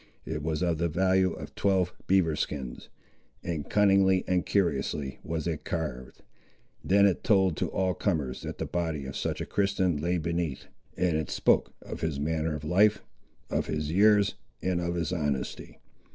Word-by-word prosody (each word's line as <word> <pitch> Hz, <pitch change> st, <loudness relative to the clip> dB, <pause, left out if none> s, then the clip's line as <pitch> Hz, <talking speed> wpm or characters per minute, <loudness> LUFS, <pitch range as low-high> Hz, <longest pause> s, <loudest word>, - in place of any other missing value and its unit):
It 80 Hz, -1 st, -3 dB
was 80 Hz, +3 st, -1 dB
of 85 Hz, -3 st, 0 dB
the 85 Hz, 0 st, +1 dB
value 95 Hz, +2 st, +2 dB
of -, -, -9 dB
twelve 95 Hz, -3 st, +1 dB
beaver 90 Hz, -5 st, +3 dB
skins, 65 Hz, -5 st, -4 dB, 0.5 s
and 80 Hz, -4 st, -4 dB
cunningly 95 Hz, -2 st, +4 dB
and 90 Hz, -1 st, +2 dB
curiously 75 Hz, -6 st, -1 dB
was 80 Hz, -1 st, -3 dB
it 80 Hz, -4 st, -3 dB
carved! 75 Hz, -7 st, -5 dB, 0.6 s
Then 100 Hz, +1 st, +5 dB
it 95 Hz, -3 st, +1 dB
told 95 Hz, -5 st, +3 dB
to -, -, 0 dB
all 95 Hz, -1 st, 0 dB
comers 75 Hz, -12 st, -1 dB
that -, -, -6 dB
the -, -, -3 dB
body 80 Hz, -5 st, -2 dB
of 65 Hz, -, -6 dB
such -, -, -2 dB
a -, -, -2 dB
Christian 95 Hz, -4 st, +1 dB
lay 85 Hz, +4 st, 0 dB
beneath; 85 Hz, -4 st, -2 dB, 0.3 s
and 90 Hz, -3 st, +1 dB
it 80 Hz, -1 st, -2 dB
spoke -, -, +2 dB
of -, -, -7 dB
his 80 Hz, -4 st, -1 dB
manner 80 Hz, +1 st, -1 dB
of 75 Hz, -, -7 dB
life, 100 Hz, +7 st, +3 dB, 0.5 s
of -, -, 0 dB
his 75 Hz, 0 st, -2 dB
years, 105 Hz, +2 st, +4 dB, 0.3 s
and 90 Hz, -1 st, -1 dB
of 85 Hz, 0 st, -2 dB
his 85 Hz, 0 st, -1 dB
honesty. 75 Hz, -6 st, -3 dB
85 Hz, 170 wpm, -28 LUFS, 75-95 Hz, 0.6 s, Then